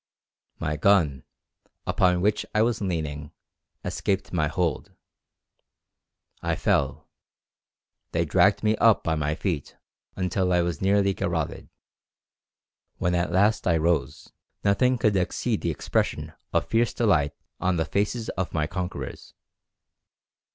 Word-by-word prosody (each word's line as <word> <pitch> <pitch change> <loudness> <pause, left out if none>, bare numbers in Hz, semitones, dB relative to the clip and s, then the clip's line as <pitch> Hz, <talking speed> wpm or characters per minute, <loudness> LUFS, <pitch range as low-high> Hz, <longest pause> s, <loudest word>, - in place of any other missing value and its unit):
My 80 -2 -2
gun, 80 -7 +3 0.6
upon 90 -1 +2
which 105 +2 +1
I 110 - +5
was 115 -1 0
leaning, 75 -6 -3 0.5
escaped 95 -1 -2
my 80 -4 +2
hold; 85 -2 -2 1.5
I - - 0
fell; - - 0 1.0
they - - +1
dragged - - +3
me 110 0 +3
up 115 0 +4
by 80 - 0
my 75 -1 -1
feet 80 -4 -3 0.4
until 90 0 0
I 90 -1 +3
was 85 -3 -3
nearly 100 0 +3
garotted. - - -3 1.3
When 90 - 0
at 85 0 0
last 105 +3 +2
I 85 -2 +4
rose, 85 +1 -1 0.3
nothing 125 +6 +3
could 105 -3 +2
exceed 90 -2 0
the - - -1
expression - - -1 0.2
of - - +1
fierce 115 +1 +1
delight 80 -11 +2 0.3
on 95 0 +1
the 80 -1 0
faces 105 +6 -1
of 95 -2 -3
my 75 -1 +1
conquerors. 90 +3 -6
90 Hz, 125 wpm, -26 LUFS, 80-100 Hz, 1.5 s, I